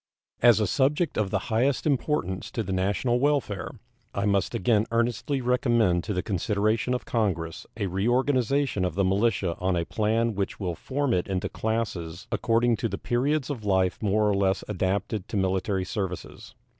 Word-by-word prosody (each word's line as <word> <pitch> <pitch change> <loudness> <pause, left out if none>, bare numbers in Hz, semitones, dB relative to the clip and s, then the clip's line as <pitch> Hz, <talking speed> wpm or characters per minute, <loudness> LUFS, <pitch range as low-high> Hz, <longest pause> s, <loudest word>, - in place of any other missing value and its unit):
As 120 -2 +6
a 105 - +2
subject 140 - +1
of 105 -3 0
the - - +1 0.2
highest 125 +4 +2
importance 135 - 0
to 115 - -1
the 95 -1 -3
national 100 +6 +1
welfare, 135 -8 0 0.5
I 100 - 0
must 100 -2 +1
again 110 +2 +2
earnestly 120 +4 0
recommend 120 -7 +2
to 105 - -2
the 90 - -1
consideration 105 +4 0
of 125 - -5
Congress 85 -8 -2
a 105 - -1
reorganization 125 +4 +1
of 90 -3 -1
the 100 - +2
militia 95 -3 +1
on 95 0 +1
a 85 -1 0
plan 115 +3 0
which 100 -1 -3
will 90 -4 -2
form 135 - -1
it 90 - 0
into 95 0 -2
classes 100 -7 -3
according 115 0 +2
to 115 - -1
the - - -3
periods 140 +4 0
of 120 -6 -5
life 95 -2 +1
more 105 0 +2
or 105 - +3
less 95 -1 +1
adapted 100 +1 -1
to 105 - -3
military 95 0 0
services. 95 -2 -5
105 Hz, 170 wpm, -26 LUFS, 95-120 Hz, 0.5 s, As